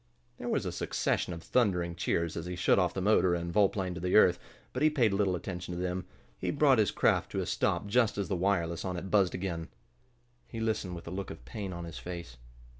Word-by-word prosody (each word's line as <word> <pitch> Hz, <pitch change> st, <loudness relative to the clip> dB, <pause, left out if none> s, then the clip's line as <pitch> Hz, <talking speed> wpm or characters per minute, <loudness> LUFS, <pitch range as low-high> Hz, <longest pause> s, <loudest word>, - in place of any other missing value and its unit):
There -, -, -5 dB
was -, -, 0 dB
a -, -, -2 dB
succession -, -, -1 dB
of 85 Hz, -1 st, -7 dB
thundering 90 Hz, -8 st, +1 dB
cheers 85 Hz, -1 st, -1 dB
as 85 Hz, +1 st, -4 dB
he 90 Hz, -, -4 dB
shut 90 Hz, -, +3 dB
off 90 Hz, -3 st, +2 dB
the 95 Hz, -, -1 dB
motor, 95 Hz, -4 st, +4 dB
and 85 Hz, 0 st, -4 dB
volplaned 95 Hz, -3 st, +1 dB
to 90 Hz, 0 st, 0 dB
earth, 90 Hz, -4 st, +6 dB, 0.3 s
but 130 Hz, -, -3 dB
he 155 Hz, -, +6 dB
paid 120 Hz, -9 st, +2 dB
little 100 Hz, -2 st, +2 dB
attention 90 Hz, 0 st, -5 dB
to -, -, -4 dB
them. 90 Hz, 0 st, -2 dB, 0.3 s
He -, -, -2 dB
brought 140 Hz, -4 st, +4 dB
his 105 Hz, -, +3 dB
craft -, -, +1 dB
to -, -, -1 dB
a -, -, -1 dB
stop -, -, 0 dB
just 110 Hz, +1 st, +2 dB
as 100 Hz, -, -1 dB
the 95 Hz, -, -1 dB
wireless 85 Hz, -2 st, 0 dB
on 90 Hz, -1 st, -3 dB
it 95 Hz, +2 st, -6 dB
buzzed 100 Hz, -4 st, +3 dB
again. 90 Hz, -3 st, -3 dB, 0.8 s
He 115 Hz, -, -7 dB
listened 110 Hz, -5 st, -1 dB
with 85 Hz, -, -9 dB
a -, -, -5 dB
look 95 Hz, +1 st, -4 dB
of -, -, -10 dB
pain 100 Hz, -4 st, -5 dB
on 85 Hz, -1 st, -6 dB
his 85 Hz, -1 st, -7 dB
face. 85 Hz, -8 st, -7 dB
90 Hz, 230 wpm, -30 LUFS, 85-100 Hz, 0.8 s, earth